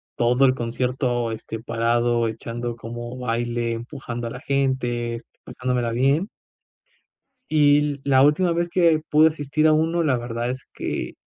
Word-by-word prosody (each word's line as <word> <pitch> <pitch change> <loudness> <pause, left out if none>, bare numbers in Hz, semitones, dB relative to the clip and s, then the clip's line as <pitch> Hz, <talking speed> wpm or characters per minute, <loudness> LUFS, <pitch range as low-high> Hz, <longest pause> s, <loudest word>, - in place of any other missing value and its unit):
todo 125 +3 +3
el 130 -1 +3
concierto 120 0 -1
este 110 0 -6
parado 115 0 +1
echando 115 +2 -5
como 120 +1 -7
baile 120 -1 -1
empujando 120 0 -6
a - - -4
la 125 - -7
gente 120 -4 -1 0.2
pasándomela 125 -2 -2
bien 135 - +2 1.2
y 145 -1 +3
la 135 -1 +4
última 155 +5 +3
vez 170 +1 -1
que 170 -3 +3
pude 155 +1 +6
asistir 155 0 0
a 155 - +5
uno. 165 +2 +1
La 130 -5 +2
verdad 120 0 -3
es 130 +1 -5
que - - -4
125 Hz, 145 wpm, -23 LUFS, 120-145 Hz, 1.2 s, pude